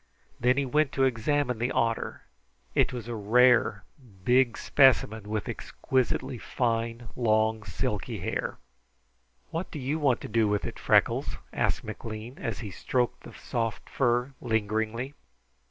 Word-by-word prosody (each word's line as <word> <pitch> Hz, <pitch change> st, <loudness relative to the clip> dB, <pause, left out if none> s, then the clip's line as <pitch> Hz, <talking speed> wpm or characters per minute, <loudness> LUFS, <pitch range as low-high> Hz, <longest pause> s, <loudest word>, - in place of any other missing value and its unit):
Then 125 Hz, +2 st, +3 dB
he 140 Hz, -, +2 dB
went 150 Hz, +2 st, +2 dB
to 135 Hz, -, +2 dB
examine 130 Hz, 0 st, +1 dB
the 120 Hz, +3 st, 0 dB
otter. 115 Hz, -2 st, -1 dB, 0.5 s
It -, -, +3 dB
was 120 Hz, -3 st, -6 dB
a 120 Hz, -, -3 dB
rare, 115 Hz, -1 st, +4 dB, 0.4 s
big 125 Hz, +1 st, +3 dB
specimen, 110 Hz, -6 st, +3 dB
with 110 Hz, -1 st, -2 dB
exquisitely 130 Hz, -1 st, -1 dB
fine, 115 Hz, 0 st, -2 dB
long, 110 Hz, -2 st, +2 dB
silky 100 Hz, -, -3 dB
hair. -, -, -3 dB, 0.9 s
"What 165 Hz, +3 st, -3 dB
do -, -, -7 dB
you 140 Hz, +3 st, -1 dB
want 135 Hz, -5 st, +3 dB
to -, -, -5 dB
do 115 Hz, -2 st, +2 dB
with 105 Hz, 0 st, 0 dB
it, -, -, -6 dB
Freckles?" -, -, +2 dB, 0.2 s
asked -, -, 0 dB
McLean, 110 Hz, +3 st, -7 dB
as 115 Hz, -4 st, -3 dB
he 105 Hz, -4 st, -6 dB
stroked 125 Hz, +5 st, -1 dB
the -, -, -12 dB
soft 115 Hz, -3 st, -3 dB
fur 125 Hz, +1 st, +1 dB
lingeringly. 110 Hz, +3 st, -1 dB
120 Hz, 140 wpm, -28 LUFS, 110-130 Hz, 0.9 s, rare